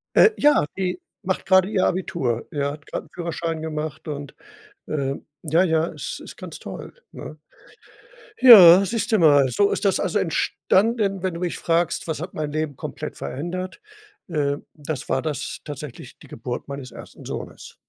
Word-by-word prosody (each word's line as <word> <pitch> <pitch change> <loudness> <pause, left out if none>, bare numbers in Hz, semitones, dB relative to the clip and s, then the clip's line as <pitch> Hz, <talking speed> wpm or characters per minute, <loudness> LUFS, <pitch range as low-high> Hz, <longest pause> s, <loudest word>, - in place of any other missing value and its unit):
Äh, 445 - +7
ja, 295 - +4
die 180 -1 -2 0.2
macht 185 0 -2
gerade 190 -1 +5
ihr 200 -4 +1
Abitur, 165 -11 -1
ja, 140 -1 -1
hat 150 +1 -11
gerade - - -5
'n - - -29
Führerschein 165 -2 -3
gemacht 155 0 -5
und, 145 -1 -6 0.5
ähm, 140 -2 -3 0.2
ja, 165 +3 +3
ja, 160 -2 +2
es - - -6
ist - - -10
ganz - - -9
toll, - - -8 0.2
ne? - - -9 1.0
Ja, 195 -7 +10
siehst 230 +3 -2
du 220 - +4
mal, 145 -5 +5
so 200 +11 +2
ist - - -2
das 195 - +3
also 210 - 0
entstanden, 195 +3 +1
wenn 185 -2 -2
du 170 - -6
mich 175 -1 -2
fragst: 170 0 0
„Was 160 -2 -3
hat 175 +2 -6
mein 150 -1 -3
Leben 155 -1 -2
komplett - - -7
verändert?“, 175 - -5 0.5
äh, 145 -3 0 0.2
das 150 -2 -6
war 130 - +1
das 155 -1 -4
tatsächlich, 145 -4 -9
die - - -15
Geburt 120 +2 -6
meines 140 -3 -7
1. - - -12
Sohnes. - - -7
165 Hz, 170 wpm, -23 LUFS, 145-185 Hz, 1.0 s, Ja